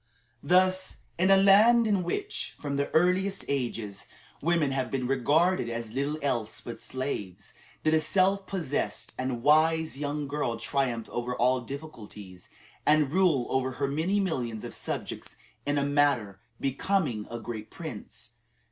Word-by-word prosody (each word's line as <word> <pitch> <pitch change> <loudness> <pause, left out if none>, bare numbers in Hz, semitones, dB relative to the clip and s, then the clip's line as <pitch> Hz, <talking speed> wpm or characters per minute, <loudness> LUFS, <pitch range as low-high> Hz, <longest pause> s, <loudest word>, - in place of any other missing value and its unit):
Thus, 185 +4 +2 0.2
in 185 +2 +3
a 195 - +7
land 215 +5 +6
in 205 -4 +2
which, 405 - -3
from 140 -1 -3
the 140 0 0
earliest 185 +4 +2
ages, 115 -7 -3 0.3
women 160 -3 +2
have 130 -2 -1
been 130 -2 -2
regarded 145 +4 +2
as 115 -2 -4
little 140 +5 -1
else 120 -6 -1
but 120 - -8
slaves, 105 -7 -5 0.3
did 155 - +3
a 160 - +5
self 190 +4 +2
possessed 145 - -3
and 130 -2 -2
wise 155 0 +3
young 145 0 -2
girl 140 -5 -2
triumph 120 -1 -1
over 120 +1 -3
all 125 +1 +2
difficulties, 110 - -9 0.3
and 150 -2 +3
rule 170 -9 +3
over 130 0 0
her 140 +2 -1
many 160 +9 0
millions 125 - -2
of - - -6
subjects - - -5 0.3
"in 145 0 +1
a 140 - +1
manner 140 -9 +1 0.2
becoming 135 - 0
a 115 - -5
great 110 -2 -6
prince." - - -8
140 Hz, 145 wpm, -28 LUFS, 120-175 Hz, 0.3 s, a